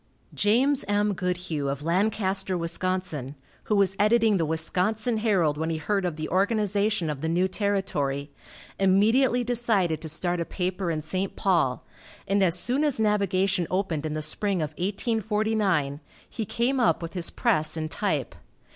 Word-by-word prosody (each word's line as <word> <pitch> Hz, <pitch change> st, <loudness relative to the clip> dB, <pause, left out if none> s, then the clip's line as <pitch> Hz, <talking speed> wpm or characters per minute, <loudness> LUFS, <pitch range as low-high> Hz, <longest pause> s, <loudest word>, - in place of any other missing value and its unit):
James 255 Hz, +7 st, +2 dB
M. 205 Hz, 0 st, +1 dB
Goodhue 180 Hz, -6 st, -2 dB
of 140 Hz, +1 st, -4 dB
Lancaster, 190 Hz, +1 st, 0 dB
Wis., 165 Hz, 0 st, -1 dB, 0.9 s
who 210 Hz, -, +1 dB
was 195 Hz, -1 st, +2 dB
editing 215 Hz, 0 st, +4 dB
the 165 Hz, -3 st, 0 dB
Wisconsin 195 Hz, +8 st, 0 dB
Herald, 185 Hz, -9 st, +1 dB
when 160 Hz, +1 st, -1 dB
he 160 Hz, -, -1 dB
heard 195 Hz, +4 st, -1 dB
of 175 Hz, -3 st, -2 dB
the 155 Hz, 0 st, -4 dB
organization 205 Hz, -1 st, +1 dB
of 150 Hz, -3 st, -4 dB
the 160 Hz, -, -1 dB
new 180 Hz, +3 st, +2 dB
territory, 185 Hz, -9 st, -1 dB, 0.5 s
immediately 225 Hz, +7 st, +3 dB
decided 225 Hz, -9 st, +1 dB
to 160 Hz, -, -5 dB
start 175 Hz, +2 st, -1 dB
a -, -, 0 dB
paper 180 Hz, 0 st, -3 dB
in 155 Hz, -2 st, -2 dB
St. 185 Hz, +5 st, -2 dB
Paul, -, -, +1 dB, 0.4 s
and 200 Hz, 0 st, +2 dB
as 180 Hz, -2 st, +4 dB
soon 255 Hz, +10 st, 0 dB
as 290 Hz, -6 st, 0 dB
navigation 195 Hz, -4 st, +1 dB
opened 175 Hz, -5 st, -1 dB
in 155 Hz, -, -4 dB
the 155 Hz, -, -1 dB
spring 195 Hz, +5 st, 0 dB
of 150 Hz, -, -4 dB
1849, 205 Hz, -, 0 dB, 0.3 s
he 220 Hz, -, -5 dB
came 245 Hz, +6 st, 0 dB
up 235 Hz, -7 st, +2 dB
with 165 Hz, -, -6 dB
his 175 Hz, -3 st, 0 dB
press 155 Hz, +1 st, 0 dB
and 155 Hz, 0 st, -3 dB
type. -, -, -1 dB
190 Hz, 160 wpm, -26 LUFS, 165-215 Hz, 0.9 s, editing